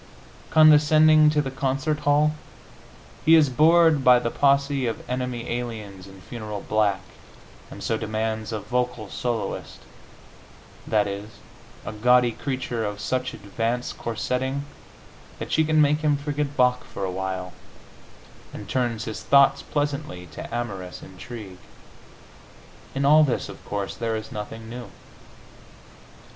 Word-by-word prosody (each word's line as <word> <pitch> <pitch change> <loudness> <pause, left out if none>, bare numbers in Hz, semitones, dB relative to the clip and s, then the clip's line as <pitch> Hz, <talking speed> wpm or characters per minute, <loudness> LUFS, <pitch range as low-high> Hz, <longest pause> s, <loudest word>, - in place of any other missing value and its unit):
Condescending 155 0 +6
to 150 -1 +1
the 135 - -4
concert 140 +3 -1
hall, 150 +1 +3 0.9
he 165 - +7
is 150 -4 +4
bored 160 +1 +5
by 125 -1 +7
the 115 -1 -2
posse 140 -1 +2
of 115 - -5
enemy 125 -1 -3
aliens 110 -6 -5
in 95 -1 -14
funereal 105 -2 -7
black, 105 -3 +1 0.7
and - - -9
so 110 -1 -1
demands 110 0 -3
a 110 - -2
vocal 125 -2 -3
soloist 120 -3 -4 1.1
that 105 -2 +2
is, 100 +1 -5 0.6
a 100 - -5
gaudy 125 +2 +4
creature 125 -2 -3
of 105 -1 -4
such 130 +4 -2
advanced 115 +4 -3
corsetting 130 +4 -2 0.7
that - - -7
she 160 - +3
can 155 0 +2
make 150 0 +4
him 150 -2 +2
forget 145 0 -3
Bach 125 -1 +3
for 100 - -5
a 95 - -3
while, 95 -1 -4 1.0
and - - -8
turn 120 -3 0
his 110 0 -5
thoughts 140 0 +4
pleasantly 145 -10 -3
to - - -8
amorous 100 -7 -5
intrigue. 95 0 -10 1.4
In 140 +1 0
all 155 +2 +7
this, 135 -5 -1
of - - -11
course, 100 -1 -3
there 115 -1 -2
is 110 0 -6
nothing 110 +2 -7
new. 120 +1 -8
125 Hz, 135 wpm, -24 LUFS, 110-145 Hz, 1.4 s, he